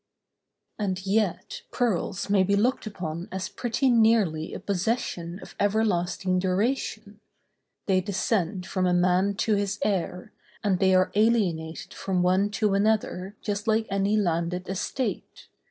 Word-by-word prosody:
And 190 Hz, -2 st, -2 dB
yet 205 Hz, -2 st, -1 dB
pearls 205 Hz, -5 st, -1 dB
may 200 Hz, -1 st, +3 dB
be 200 Hz, +2 st, +2 dB
looked 235 Hz, +3 st, +1 dB
upon 175 Hz, -4 st, -5 dB
as 190 Hz, 0 st, -4 dB
pretty 245 Hz, +3 st, -1 dB
nearly 220 Hz, -9 st, +3 dB
a -, -, -6 dB
possession 185 Hz, -3 st, -2 dB
of -, -, -12 dB
everlasting 190 Hz, -3 st, +1 dB
duration—they 205 Hz, -1 st, -3 dB
descend 190 Hz, -1 st, -1 dB
from 185 Hz, -1 st, 0 dB
a 180 Hz, -, +2 dB
man 185 Hz, +3 st, +2 dB
to 215 Hz, +2 st, +1 dB
his 200 Hz, -1 st, 0 dB
heir, 185 Hz, 0 st, -2 dB, 0.3 s
and 195 Hz, -4 st, +1 dB
they 190 Hz, -1 st, +4 dB
are 185 Hz, 0 st, +3 dB
alienated 195 Hz, -8 st, 0 dB
from 185 Hz, -2 st, -1 dB
one 185 Hz, +3 st, +3 dB
to 210 Hz, -1 st, 0 dB
another 200 Hz, -2 st, 0 dB
just 205 Hz, +1 st, -3 dB
like 220 Hz, 0 st, +2 dB
any 200 Hz, +2 st, +1 dB
landed 175 Hz, -1 st, -1 dB
estate. 195 Hz, +7 st, -4 dB
195 Hz, 135 wpm, -26 LUFS, 180-215 Hz, 0.3 s, they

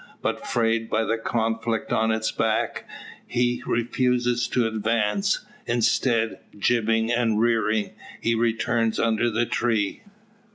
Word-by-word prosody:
But, -, -, -2 dB
frayed 115 Hz, -1 st, 0 dB
by 110 Hz, -, +1 dB
the 115 Hz, 0 st, -1 dB
conflict 115 Hz, 0 st, -1 dB
on 110 Hz, 0 st, +2 dB
his 110 Hz, 0 st, 0 dB
back, 110 Hz, -1 st, -1 dB, 0.4 s
he 120 Hz, 0 st, 0 dB
refuses 120 Hz, 0 st, +1 dB
to 120 Hz, -1 st, +1 dB
advance; 115 Hz, -, 0 dB, 0.2 s
instead, 115 Hz, -1 st, +1 dB, 0.2 s
jibbing 115 Hz, +1 st, +1 dB
and 115 Hz, -3 st, +1 dB
rearing, 110 Hz, -2 st, +1 dB, 0.3 s
he 115 Hz, -, +1 dB
returns 115 Hz, 0 st, 0 dB
under 115 Hz, +1 st, +2 dB
the 115 Hz, +1 st, 0 dB
tree. 110 Hz, -4 st, 0 dB
115 Hz, 120 wpm, -24 LUFS, 110-120 Hz, 0.4 s, on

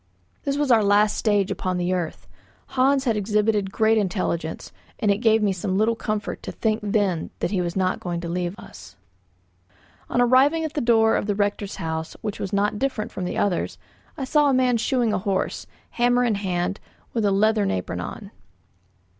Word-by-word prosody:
This 280 Hz, 0 st, 0 dB
was 290 Hz, -3 st, +1 dB
our 225 Hz, -3 st, +5 dB
last 205 Hz, +1 st, +3 dB
stage 205 Hz, -3 st, +1 dB
upon 185 Hz, -1 st, -2 dB
the 180 Hz, +1 st, 0 dB
earth. 175 Hz, -3 st, -3 dB, 0.4 s
Hans 270 Hz, +1 st, +2 dB
had 235 Hz, -5 st, +1 dB
exhibited 210 Hz, -1 st, +1 dB
great 220 Hz, +1 st, +3 dB
intelligence, 175 Hz, -5 st, -2 dB, 0.3 s
and 210 Hz, -, +2 dB
it 200 Hz, -, 0 dB
gave 220 Hz, -2 st, +3 dB
me 200 Hz, -2 st, +2 dB
some 190 Hz, +1 st, -2 dB
little 220 Hz, +3 st, +3 dB
comfort 215 Hz, -2 st, -3 dB
to -, -, -6 dB
think 220 Hz, -1 st, 0 dB
then 200 Hz, -5 st, 0 dB
that -, -, -2 dB
he 190 Hz, -3 st, +1 dB
was 175 Hz, -1 st, -3 dB
not 185 Hz, -1 st, 0 dB
going 175 Hz, -1 st, -3 dB
to 170 Hz, -, -5 dB
leave 175 Hz, +2 st, -3 dB
us. -, -, -13 dB, 1.1 s
On -, -, 0 dB
arriving 265 Hz, +6 st, +4 dB
at 315 Hz, -1 st, -4 dB
the 295 Hz, -, -1 dB
door 225 Hz, -1 st, +4 dB
of -, -, -1 dB
the 205 Hz, -, 0 dB
rector's 205 Hz, 0 st, -1 dB
house, 160 Hz, 0 st, -4 dB
which 210 Hz, -2 st, -4 dB
was 195 Hz, -, -4 dB
not 205 Hz, +1 st, 0 dB
different 260 Hz, -6 st, -2 dB
from 185 Hz, -, -4 dB
the -, -, -3 dB
others, 185 Hz, -4 st, 0 dB, 0.4 s
I 275 Hz, -, -3 dB
saw 295 Hz, +2 st, +3 dB
a 270 Hz, -, +3 dB
man 250 Hz, -2 st, +3 dB
shoeing 235 Hz, -1 st, +1 dB
a -, -, +1 dB
horse, 195 Hz, -1 st, -2 dB, 0.2 s
hammer 245 Hz, +1 st, +2 dB
in 235 Hz, -3 st, +2 dB
hand, 190 Hz, -1 st, -2 dB
and -, -, -31 dB
with 230 Hz, -, 0 dB
a 200 Hz, -, +3 dB
leathern 210 Hz, +1 st, +2 dB
apron 90 Hz, -1 st, -3 dB
on. 90 Hz, -, -7 dB
210 Hz, 195 wpm, -23 LUFS, 185-230 Hz, 1.1 s, our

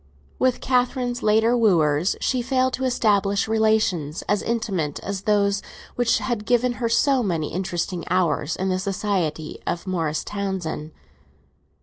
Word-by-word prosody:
With 255 Hz, -1 st, +1 dB
Catherine's 250 Hz, -1 st, 0 dB
later 220 Hz, +3 st, +3 dB
wooers 170 Hz, -7 st, +3 dB
she 255 Hz, -2 st, 0 dB
failed 260 Hz, +1 st, +1 dB
to 265 Hz, -, -2 dB
establish 205 Hz, -5 st, +2 dB
relations 215 Hz, -9 st, +1 dB
as 205 Hz, -, 0 dB
intimate 195 Hz, -11 st, -2 dB
as 195 Hz, -1 st, -4 dB
those 200 Hz, -1 st, +2 dB, 0.3 s
which 245 Hz, -1 st, +2 dB
had 230 Hz, -4 st, -3 dB
given 245 Hz, 0 st, +2 dB
her 230 Hz, -, +1 dB
so 270 Hz, +3 st, +3 dB
many 170 Hz, -8 st, -2 dB
interesting 175 Hz, 0 st, -2 dB
hours 170 Hz, -3 st, +1 dB
in 190 Hz, +1 st, -2 dB
the 185 Hz, 0 st, 0 dB
society 185 Hz, -5 st, -2 dB
of 170 Hz, -, -2 dB
Morris 165 Hz, -5 st, -1 dB
Townsend. 190 Hz, -6 st, -4 dB
200 Hz, 135 wpm, -23 LUFS, 175-235 Hz, 0.3 s, later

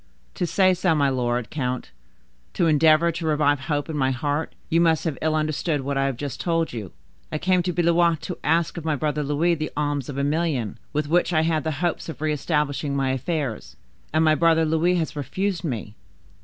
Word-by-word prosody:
"To 175 Hz, -, -2 dB
say 185 Hz, +1 st, +4 dB
so, 180 Hz, -2 st, +1 dB
my 140 Hz, -2 st, +3 dB
lord 125 Hz, -2 st, -1 dB
count, 130 Hz, -4 st, -3 dB, 0.6 s
to -, -, +2 dB
endeavor 160 Hz, +1 st, +4 dB
to 165 Hz, 0 st, -5 dB
revive 145 Hz, -2 st, +2 dB
hope 145 Hz, +2 st, -2 dB
in 160 Hz, -, -5 dB
my 135 Hz, -2 st, +1 dB
heart, 145 Hz, +4 st, -2 dB
you 165 Hz, +1 st, +2 dB
must 165 Hz, -2 st, +3 dB
have 160 Hz, -4 st, -1 dB
ill 155 Hz, 0 st, +1 dB
understood 155 Hz, 0 st, 0 dB
what 140 Hz, +1 st, -3 dB
I 135 Hz, 0 st, +1 dB
have 135 Hz, -3 st, -3 dB
just 140 Hz, 0 st, -5 dB
told 165 Hz, -4 st, 0 dB
you. 105 Hz, -6 st, -6 dB, 0.4 s
I 155 Hz, -, -1 dB
came 185 Hz, +3 st, +2 dB
to 180 Hz, +1 st, -1 dB
Blois 170 Hz, 0 st, +3 dB
to 180 Hz, +3 st, -6 dB
ask 165 Hz, +3 st, +1 dB
of 170 Hz, -, -5 dB
my 155 Hz, -1 st, 0 dB
brother 150 Hz, +1 st, -1 dB
Louis 150 Hz, +4 st, +1 dB
the 155 Hz, -2 st, -2 dB
alms 145 Hz, -3 st, -1 dB
of 140 Hz, -, -5 dB
a 140 Hz, -, 0 dB
million, 145 Hz, -, -1 dB
with 150 Hz, 0 st, -1 dB
which 175 Hz, +3 st, +2 dB
I 155 Hz, -, +4 dB
had 160 Hz, -1 st, +1 dB
the 160 Hz, -, -1 dB, 0.2 s
hopes 170 Hz, -, -2 dB
of 155 Hz, -, -7 dB
re 155 Hz, 0 st, 0 dB
establishing 150 Hz, -1 st, -1 dB
my 135 Hz, -1 st, +1 dB
affairs; 135 Hz, -2 st, -3 dB, 0.4 s
and 160 Hz, +1 st, +3 dB
my 155 Hz, -, +5 dB
brother 165 Hz, 0 st, +3 dB
Louis 160 Hz, +3 st, +2 dB
has 160 Hz, -4 st, -2 dB
refused 175 Hz, +6 st, -2 dB
me. 115 Hz, -9 st, -4 dB
155 Hz, 210 wpm, -24 LUFS, 140-165 Hz, 0.6 s, my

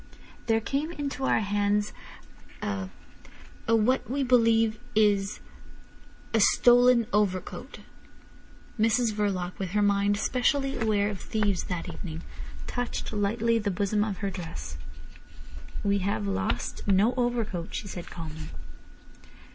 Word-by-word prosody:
There 225 Hz, -1 st, +3 dB
came 280 Hz, +8 st, -2 dB
into 280 Hz, -4 st, -3 dB
our -, -, +3 dB
hands 205 Hz, 0 st, +1 dB, 0.7 s
a—a—what 210 Hz, -, -2 dB
we 275 Hz, +2 st, 0 dB
believe 230 Hz, -3 st, +3 dB, 0.2 s
is—a 210 Hz, +1 st, -2 dB
stolen 245 Hz, +2 st, +6 dB
overcoat." 190 Hz, -3 st, -1 dB, 1.0 s
Mrs 225 Hz, +1 st, +3 dB
Verloc, 190 Hz, -4 st, -2 dB
with 190 Hz, -1 st, -3 dB
her 210 Hz, 0 st, +3 dB
mind 200 Hz, 0 st, +3 dB
specially 270 Hz, +4 st, +1 dB
aware 215 Hz, -3 st, +1 dB
of 200 Hz, -, -7 dB
thieves 205 Hz, -4 st, 0 dB
that 175 Hz, -2 st, -4 dB
evening, 165 Hz, -3 st, -6 dB, 0.4 s
touched 245 Hz, -2 st, -3 dB
lightly 225 Hz, +3 st, +1 dB
the 205 Hz, -2 st, -1 dB
bosom 205 Hz, +2 st, +1 dB
of 205 Hz, -3 st, -3 dB
her 195 Hz, -, -1 dB
dress. 160 Hz, -, -6 dB, 1.1 s
"We 200 Hz, 0 st, +2 dB
have 185 Hz, -, -1 dB
lost 95 Hz, -, -2 dB
no 200 Hz, +5 st, +4 dB
overcoat," 235 Hz, -8 st, -1 dB
she 205 Hz, -, -4 dB
said 175 Hz, -3 st, -7 dB
calmly. 155 Hz, -2 st, -7 dB
210 Hz, 115 wpm, -28 LUFS, 190-230 Hz, 1.1 s, stolen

